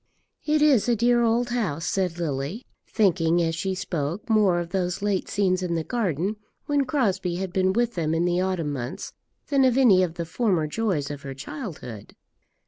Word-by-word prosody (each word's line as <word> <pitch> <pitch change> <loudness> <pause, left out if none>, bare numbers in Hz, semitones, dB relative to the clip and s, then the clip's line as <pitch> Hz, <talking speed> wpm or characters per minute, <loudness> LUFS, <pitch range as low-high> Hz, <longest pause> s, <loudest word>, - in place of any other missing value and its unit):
"It 300 0 +3
is 265 -7 +4
a 240 - +4
dear 240 +2 +3
old 235 +1 +2
house," 185 -10 -2
said 180 -3 -1
Lily, 155 - -3 0.2
thinking, 175 -5 +2
as 165 0 0
she 190 +3 -2
spoke, 170 0 -3
more 200 -5 +4
of 170 -1 -4
those 180 +1 -2
late 200 -3 0
scenes 185 -2 +1
in 175 -2 -1
the 165 - -1
garden, 200 - -1 0.3
when 285 -1 +1
Crosbie 200 - 0
had 185 0 -4
been 190 0 +2
with 235 +3 0
them 160 -2 -1
in 165 +1 +1
the 175 0 +1
autumn 180 -6 -1
months, 125 -2 -5 0.4
than 275 -2 +3
of 255 -1 +3
any 220 -9 +6
of 175 -3 -1
the 170 - -3
former 180 -3 0
joys 155 -4 -1
of 145 -1 -7
her 135 -1 -7
childhood. 145 - -8
185 Hz, 190 wpm, -25 LUFS, 165-225 Hz, 0.4 s, any